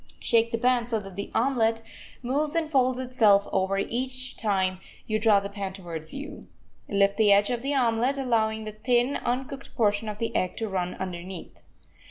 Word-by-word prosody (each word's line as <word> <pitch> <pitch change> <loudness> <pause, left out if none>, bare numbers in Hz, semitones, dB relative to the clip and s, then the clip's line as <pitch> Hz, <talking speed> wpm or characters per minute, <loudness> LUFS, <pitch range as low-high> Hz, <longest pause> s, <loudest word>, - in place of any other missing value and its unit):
Shake 230 0 +2
the 230 - 0
pan 245 0 +2
so 230 -2 0
that 195 -2 -10
the 200 - -5
omelet 225 -2 +2 0.4
moves 290 +5 0
and 330 -1 +1
folds 260 -4 +2
itself 225 -6 +3
over 190 +1 +1
each 255 +5 -2
time 190 -3 0 0.3
you 215 0 -1
draw 215 -2 +5
the 200 - -5
pan 200 -1 -5
towards 170 -5 -7
you. 280 +2 -8 0.4
Lift 200 0 +2
the 215 -2 +5
edge 200 +3 +4
of 240 -1 -2
the 280 +2 -1
omelet, 245 +1 +2
allowing 220 -4 0
the 215 - -5
thin, 245 +5 +1
uncooked 265 +2 -4
portion 215 -1 +1
of 210 - -5
the 230 +1 -3
egg 185 - 0
to 225 - -2
run 180 -3 -2
underneath. 185 -1 -7
225 Hz, 185 wpm, -26 LUFS, 200-250 Hz, 0.4 s, draw